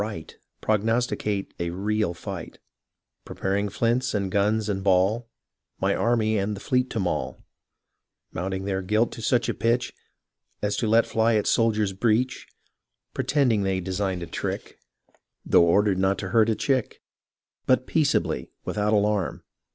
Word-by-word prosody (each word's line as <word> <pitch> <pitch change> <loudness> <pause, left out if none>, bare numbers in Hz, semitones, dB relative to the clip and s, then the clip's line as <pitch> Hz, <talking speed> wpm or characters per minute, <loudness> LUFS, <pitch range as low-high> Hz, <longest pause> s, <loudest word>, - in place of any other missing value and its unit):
Right, 105 -6 -6 0.3
Prognosticate 110 -2 0
a 85 0 -1
real 100 0 -1
fight; 90 0 -7 0.7
Preparing 100 +2 -2
flints, 120 +2 0
and 100 -2 -1
guns 105 +2 +1
and 95 -2 -2
ball, 100 +5 +2 0.5
My - - +1
army 110 -2 +1
and 100 +2 -1
the - - -8
fleet 125 +2 0
to 115 - -3
maul; 90 -3 -2 0.9
Mounting 95 +2 -3
their 95 -1 -1
guilt 105 +5 +1
to - - -8
such 120 +2 +1
a - - 0
pitch 120 +2 0 0.7
As 105 0 -1
to 115 - 0
let 115 +2 +4
fly 110 0 +2
at 105 - +1
soldier's 110 -3 +2
breech, 115 +5 0 0.7
Pretending 125 -8 +1
they 95 -1 0
designed 95 -1 -2
a - - -4
trick - - -5 0.7
Tho' - - +5
ordered 95 +3 +3
not 95 +1 +2
to - - -5
hurt 115 -1 +4
a 110 - +2
chick; 130 +1 -1 0.6
But 130 0 +3
peaceably, 150 -1 0 0.2
without 105 0 0
alarm. 105 -2 0
105 Hz, 145 wpm, -25 LUFS, 95-115 Hz, 0.9 s, Tho